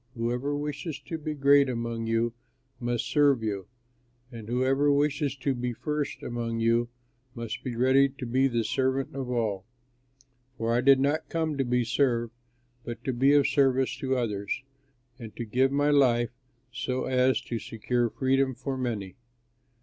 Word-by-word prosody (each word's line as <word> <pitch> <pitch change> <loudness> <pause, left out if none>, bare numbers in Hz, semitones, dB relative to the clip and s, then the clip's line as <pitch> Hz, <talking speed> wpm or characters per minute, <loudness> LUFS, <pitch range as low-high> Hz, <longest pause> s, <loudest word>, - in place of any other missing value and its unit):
Whoever 125 +5 -1
wishes 145 +2 -4
to 165 - -6
be 155 0 -4
great 140 -1 +5
among 115 -2 -3
you 115 +1 +1 0.5
must 120 -1 -1
serve 140 -5 +3
you, 100 -3 -3 0.6
and 115 -2 -9
whoever 135 +4 +2
wishes 145 0 +1
to 135 +1 -1
be 125 -1 -3
first 150 +3 -3
among 115 -1 -3
you 115 +1 +2 0.5
must 115 -2 -5
be 125 -2 -4
ready 130 +3 +4
to 130 -1 -8
be 130 +3 +2
the 120 -3 0
servant 130 +4 -1
of 135 -2 -4
all. 110 -6 -1 0.9
For 115 +1 0
I 120 - +2
did 135 +1 +6
not 145 +4 0
come 160 -2 -1
to 135 - 0
be 125 -1 +1
served 120 -1 +1 0.5
but 120 0 -7
to 130 - -1
be 135 +4 +4
of 145 -1 +5
service 135 -2 +2
to 130 -1 -1
others, 105 +1 -2 0.6
and 115 -3 -9
to 120 - -4
give 130 +5 +2
my 145 +1 +2
life 120 -5 +3 0.4
so 130 +1 -2
as 130 -2 +2
to 115 - -4
secure 120 +2 -1
freedom 130 +1 +1
for 130 +2 -4
many." 110 -6 -3
130 Hz, 165 wpm, -27 LUFS, 115-140 Hz, 0.9 s, did